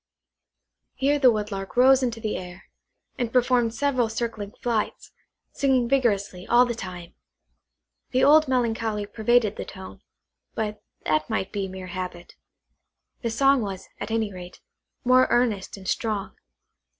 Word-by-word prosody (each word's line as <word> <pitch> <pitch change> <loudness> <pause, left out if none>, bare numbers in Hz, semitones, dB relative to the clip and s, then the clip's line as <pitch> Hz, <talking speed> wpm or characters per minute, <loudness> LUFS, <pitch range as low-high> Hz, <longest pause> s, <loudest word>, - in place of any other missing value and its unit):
Here 285 +2 +1
the 255 -3 +6
Woodlark 205 -1 -4
rose 265 +1 +6
into 235 -3 -1
the 220 -2 -2
air, 180 +1 -8 0.6
and 240 -2 -1
performed 245 -2 +2
several 260 -5 +1
circling 220 -3 -4
flights, 230 -3 -2 0.4
singing 260 -3 +2
vigorously 205 -8 0
all 245 +1 +6
the 240 - -2
time. 180 -5 -8 1.0
The 260 0 +1
old 310 +2 +6
melancholy 225 -4 0
pervaded 220 0 +1
the - - -3
tone, 190 0 -10 0.5
but 210 -1 -3 0.2
that 155 0 +1
might 190 - -2
be 200 -2 -2
mere 190 0 -8
habit. 180 -2 -6 0.9
The 235 - -1
song 270 +3 +3
was, 195 -3 -6
at - - -5
any 220 -2 -1
rate, 180 -1 -10 0.4
more 255 0 +5
earnest 225 -6 0
and 190 -1 -10
strong. 215 -2 -2
225 Hz, 140 wpm, -25 LUFS, 195-250 Hz, 1.0 s, the